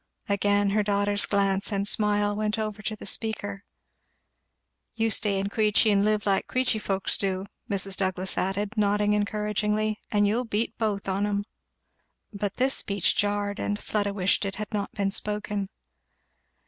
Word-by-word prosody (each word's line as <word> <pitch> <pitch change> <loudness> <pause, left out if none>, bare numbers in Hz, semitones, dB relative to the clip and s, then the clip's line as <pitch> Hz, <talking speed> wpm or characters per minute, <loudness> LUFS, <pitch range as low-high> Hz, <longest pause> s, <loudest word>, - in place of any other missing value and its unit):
Again 205 0 +2
her 210 +1 +3
daughter's 205 0 +1
glance 195 0 +1
and 200 0 0
smile 205 -1 +2
went 215 0 -1
over 215 -1 -3
to 215 +1 -3
the - - -10
speaker. 205 -2 -3 1.3
"You 225 -1 +1
stay 205 -2 +2
in 195 +1 -1
Queechy 215 +1 +3
and 200 -1 +3
live 210 0 +1
like 195 -2 +1
Queechy 255 -3 +1
folks 195 -1 0
do," 190 -1 -1 0.2
Mrs. 195 -1 0
Douglass 190 -1 0
added, 200 +3 -1
nodding 210 0 +2
encouragingly, 210 +1 0
"and 205 -1 +3
you'll 220 +5 +1
beat 225 +1 -1
both 210 -3 -1
on 195 +2 +1
'em." 205 0 0 0.9
But 200 -1 -3
this 265 +1 +2
speech 200 -2 +1
jarred, 205 0 0
and 205 - -1
Fleda 205 -1 -1
wished 195 0 +1
it 195 -1 -3
had 215 +2 -6
not 205 -1 -2
been 200 -1 0
spoken. 210 -1 -2
205 Hz, 160 wpm, -27 LUFS, 200-210 Hz, 1.3 s, her